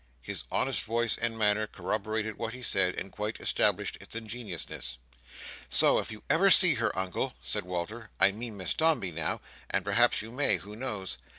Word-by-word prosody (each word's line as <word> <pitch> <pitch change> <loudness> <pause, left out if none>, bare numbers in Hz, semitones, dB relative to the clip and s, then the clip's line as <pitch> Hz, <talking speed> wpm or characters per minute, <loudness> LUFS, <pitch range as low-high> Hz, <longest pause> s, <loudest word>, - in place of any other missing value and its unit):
His - - -4
honest - - +1
voice 115 0 +1
and 115 -1 -1
manner 105 0 +2
corroborated 110 +3 -3
what 115 +2 -4
he 125 - -8
said, 95 -5 +2
and 95 - -3
quite 105 +1 -4
established - - +1
its - - -10
ingenuousness. 105 - -5 0.7
"So, - - +4
if - - -4
you 110 - -9
ever 195 +5 +4
see 180 -3 +9
her, 115 -3 +1
Uncle," 95 -7 -2
said 70 +5 -1
Walter, 90 +6 -5
"I 95 +1 +6
mean 110 +1 -7
Miss 95 - -1
Dombey 160 - +2
now—and 80 -1 -4
perhaps - - +3
you 115 - -9
may, 140 +4 +3
who 105 +2 -10
knows! 105 - -5
110 Hz, 175 wpm, -29 LUFS, 95-115 Hz, 0.7 s, see